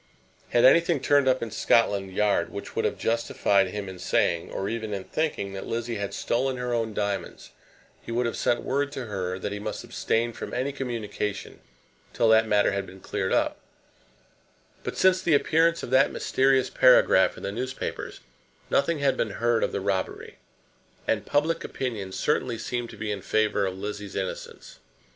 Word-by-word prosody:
Had 120 - +4
anything 165 +3 +5
turned 145 0 +3
up 130 -2 +2
in 115 - -5
Scotland 100 -4 +2
Yard 100 -3 +1
which 100 - -8
would - - 0
have - - -1
justified 100 -4 +1
him 100 +1 -5
in 95 -1 -8
saying, 85 -1 +1
or 95 - -3
even 110 -1 -3
in 95 - -5
thinking, 145 -11 -2
that 95 - -6
Lizzie 115 0 -3
had 100 -1 -3
stolen 130 +2 0
her 125 -1 -2
own 115 -2 -1
diamonds, 100 -1 -3 0.5
he - - -8
would 120 +1 0
have 115 - -2
sent 120 - 0
word 140 +1 -1
to 130 - -5
her 95 -4 -3
that 100 +2 -4
he 105 - -4
must 105 - -5
abstain 115 +1 -1
from - - -6
any 130 +3 -1
communication 110 -6 -4 0.5
till 115 - +2
that 110 0 +5
matter 105 -1 +3
had 100 0 -3
been 95 - -12
cleared 95 0 -3
up; - - +1 1.2
but - - -5
since 185 0 +4
the 165 -4 +3
appearance 165 +3 +2
of - - -6
that 130 +1 +5
mysterious 130 -1 +2
paragraph 125 -7 +5
in - - -10
the 100 - -2
newspapers, 125 +4 -5 0.5
nothing 160 +4 +2
had 140 -2 +2
been 110 -3 -2
heard 120 0 +2
of - - 0
the - - -2
robbery, 95 -1 -3 0.7
and 105 -2 0
public 165 +4 +1
opinion 110 -8 -4
certainly 125 +1 0
seemed 120 +1 -3
to - - -11
be 105 -1 -3
in 100 -2 -4
favour 105 0 +1
of 95 0 -5
Lizzie's 105 0 -6
innocence. 95 -1 -6
115 Hz, 180 wpm, -26 LUFS, 100-130 Hz, 1.2 s, anything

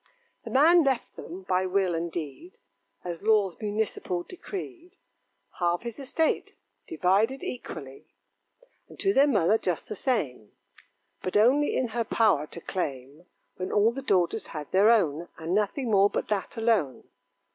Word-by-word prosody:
The - - -6
man 325 +5 +6
left 265 -4 -1
them, 180 +4 -9
by 185 0 0
will 185 -1 +1
and 170 +1 -2
deed, 170 - -7 0.5
As 175 -2 -5
laws 205 -4 +2
municipal 205 -4 -2
decreed, 365 - -9 0.6
Half 175 +1 +1
his 235 0 -6
estate, 295 +4 -1 0.3
divided 225 - +1
equally; 135 - -7 0.8
And - - -15
to 390 - +2
their 280 -3 +5
mother 215 - +3
just 180 -3 -2
the - - -4
same: 145 - -2 0.7
But 185 - -1
only 265 +7 +3
in 255 -2 0
her 230 +1 -1
power 205 -9 +2
to 170 - -8
claim 145 -1 -5 0.3
When 185 - -4
all 210 +2 +4
the 270 +3 -6
daughters 185 -9 +1
had 150 -3 -7
their 200 +3 +5
own 175 -8 +2
And 165 +2 -3
nothing 215 +5 0
more 200 0 +5
but - - -3
that 210 +2 -2
alone. 225 - +1
205 Hz, 150 wpm, -27 LUFS, 175-245 Hz, 0.8 s, man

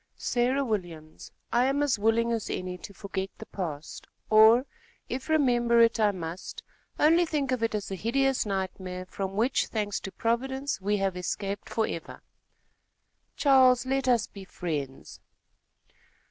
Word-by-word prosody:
"Sarah 255 +3 0
Williams, 170 -8 -5 0.2
I 240 +2 +4
am 275 +2 +1
as 275 -7 +1
willing 225 +2 +2
as 225 -2 -2
any 185 0 -3
to 180 - -10
forget 195 -1 -5
the 220 - -9
past, 160 -8 -6 0.2
or, 220 +4 +7 0.4
if 260 +4 -5
remember 240 -6 +3
it 230 0 +4
I 215 -1 +4
must, 175 -2 -6 0.3
only 330 +3 +5
think 295 -5 -1
of 255 -2 0
it 225 -1 0
as 205 -2 -4
a - - -2
hideous 270 +6 +1
nightmare 185 -2 -4
from 195 +1 -5
which, 235 +6 +1
thanks 205 -2 -2
to 195 - -7
Providence, 265 +3 -2
we 205 +2 +1
have 195 -2 -1
escaped 195 +2 -4
forever." 220 -7 -3 1.1
"Charles, 260 -3 +5
let 270 0 -1
us 240 -3 +3
be 200 - -11
friends." 150 -8 -5
220 Hz, 145 wpm, -28 LUFS, 190-255 Hz, 1.1 s, or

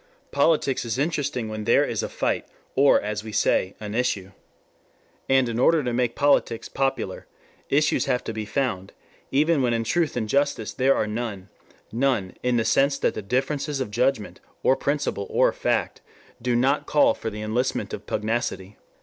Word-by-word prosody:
Politics 150 -5 +2
is 115 -1 -3
interesting 140 -5 -1
when 110 -1 -5
there 115 - +4
is - - -2
a - - -4
fight, - - -1 0.3
or 140 +1 +5
as 105 0 -4
we 110 - -7
say, 95 -2 +1
an 105 -1 -6
issue. 105 -6 -1 1.0
And 130 -1 +4
in 115 0 -2
order 160 +4 +4
to 125 -1 -2
make 120 -1 0
politics 140 -5 +2
popular, 135 0 -2 0.4
issues 150 +2 +2
have 125 - 0
to 115 - -5
be 110 0 -4
found, 105 -5 -2 0.4
even 150 +2 +2
when 120 -2 +1
in 115 - -1
truth 155 +4 0
and 110 -3 -1
justice, 140 -3 0
there 135 +1 +3
are - - +1
none, 105 -3 -5 0.4
none, 115 -6 0
in 125 -1 +1
the 115 - +1
sense 140 +1 +3
that - - 0
the - - -5
differences 135 +6 -1
of 130 -6 -3
judgment, 125 -1 0 0.2
or 130 - +4
principle, 140 -9 -2
or - - +3
fact, - - -1 0.4
do 125 0 0
not 135 +4 +1
call 280 0 +4
for 115 - -5
the 105 0 -6
enlistment 120 +4 -1
of - - -7
pugnacity. 105 -3 -2
125 Hz, 175 wpm, -24 LUFS, 110-140 Hz, 1.0 s, or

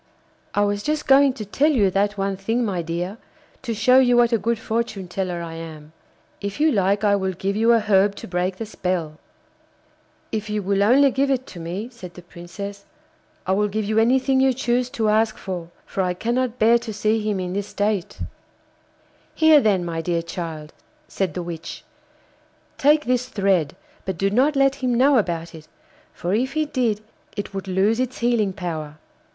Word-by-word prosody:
'I 205 - +3
was 205 0 0
just 300 +5 -2
going 275 0 +6
to 220 -5 -7
tell 275 +9 +2
you 205 -9 +3
that 205 +2 0
one 195 0 -1
thing, 225 +5 -1
my 190 -5 -1
dear, 175 +6 -4 0.4
to 245 - -4
show 250 +4 +5
you 245 -2 +4
what 240 0 +4
a 230 - +3
good 230 +4 0
fortune 220 -4 -3
teller 180 -1 -3
I 165 -1 -7
am. 160 -2 -9 0.5
If 200 +5 -5
you 310 +1 +4
like, 200 -1 +1
I 205 -1 +4
will 190 -1 -1
give 195 +3 -2
you 225 +2 +3
a 230 - +5
herb 200 -1 +3
to - - -9
break 180 +1 -1
the 225 - -5
spell.' 180 -7 -3 1.1
'If 215 -1 -3
you 210 -1 -2
will 195 +1 +1
only 265 +6 +5
give 275 +2 +1
it 260 -1 0
to 175 - -9
me,' 180 +8 -5
said 185 -8 -11
the 180 - -11
Princess, 200 +4 -8 0.6
'I 185 - -1
will 210 +2 +2
give 215 +1 -2
you 215 +2 +1
anything 260 +3 +3
you 265 0 +4
choose 245 0 0
to 230 -5 -1
ask 215 +1 +2
for, 175 -4 -6 0.2
for 195 - -3
I 180 -1 0
cannot 240 +4 -1
bear 230 +1 +5
to 235 -1 -6
see 215 +1 0
him 210 -2 -1
in 180 -1 -3
this 200 +1 -3
state.' 205 -3 -2 1.1
'Here, 315 -2 +6
then, 195 -6 +2
my 165 -1 -3
dear 170 0 -1
child,' 165 -2 -6 0.3
said 185 -6 -2
the 180 - -3
witch, 170 -1 -7 1.0
'take 300 +2 +4
this 250 +1 0
thread, 195 - +1 0.3
but 190 -3 -3
do 195 +3 +1
not 270 +7 +3
let 275 0 +4
him 250 -2 +1
know 270 +1 +5
about 170 -4 -3
it, 155 -1 -12 0.4
for 175 +2 -3
if 255 +5 0
he 310 0 +1
did 240 -7 -1 0.4
it 205 0 -5
would 195 0 -5
lose 195 +5 +1
its 255 0 -2
healing 235 -4 +1
power. 160 -5 -5
205 Hz, 195 wpm, -22 LUFS, 185-240 Hz, 1.1 s, going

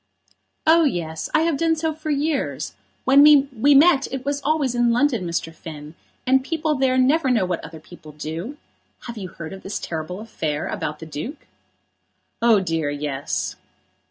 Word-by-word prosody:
"Oh, 330 +1 +6
yes; 165 - -2
I 310 - +3
have 325 -3 +1
done 325 +1 +2
so 320 0 -1
for 310 0 -7
years. 295 0 -1 0.3
When 270 +2 +6
we 285 -2 +5
met 285 -1 +5
it 265 -1 -5
was 285 0 -1
always 285 -3 +1
in 240 -1 +2
London, 240 -6 +1
Mr. 165 -1 -3
Finn; 155 -1 -10 0.3
and 260 0 +3
people 315 +1 -1
there 260 -2 +1
never 270 +3 +3
know 225 -7 +2
what 180 -2 -3
other 160 0 -9
people 155 0 -14
do. 160 - -6 0.4
Have 235 - -8
you 190 - -5
heard 165 0 -8
of 190 - -9
this 195 - -4
terrible 165 +3 -5
affair 160 -9 -3
about 150 - -4
the 160 - -9
Duke?" 160 - -7 1.0
"Oh, 230 -3 +5
dear, 165 -4 -1
yes." 145 -1 -3
245 Hz, 170 wpm, -22 LUFS, -, 1.0 s, Oh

